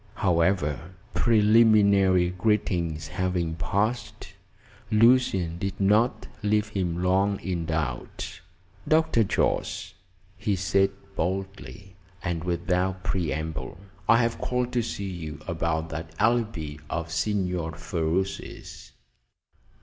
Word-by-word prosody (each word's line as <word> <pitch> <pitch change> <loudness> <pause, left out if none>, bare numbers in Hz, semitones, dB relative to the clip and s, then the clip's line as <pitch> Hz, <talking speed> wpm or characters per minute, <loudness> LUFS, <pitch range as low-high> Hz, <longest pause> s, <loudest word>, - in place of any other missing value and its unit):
However, 85 -2 +1 0.2
preliminary 105 -5 +4
greetings 90 -6 0
having 90 -2 -1
passed, 105 +8 -2 0.6
Lucian 110 -7 +3
did 100 +1 -3
not 105 +5 +2
leave 105 +1 +1
him 90 -4 -2
long 95 +2 +2
in 85 -2 -3
doubt. 80 +1 -3 0.5
"Dr. 160 -7 +3
Jorce," 95 - -1 0.5
he 105 -1 0
said 95 +1 +2 0.3
boldly, 95 +1 -4 0.3
and 85 -3 -2
without 90 +1 -1
preamble, 80 -3 -3 0.3
"I 115 - +7
have 115 0 -1
called 125 0 -1
to 120 - +2
see 105 -3 -4
you 80 -5 -6
about 80 -1 -1
that 80 +1 -6
alibi 110 -10 0
of 85 -1 -3
Signor 90 -2 -1
Ferruci's." 85 +3 -3
95 Hz, 100 wpm, -26 LUFS, 85-105 Hz, 0.6 s, I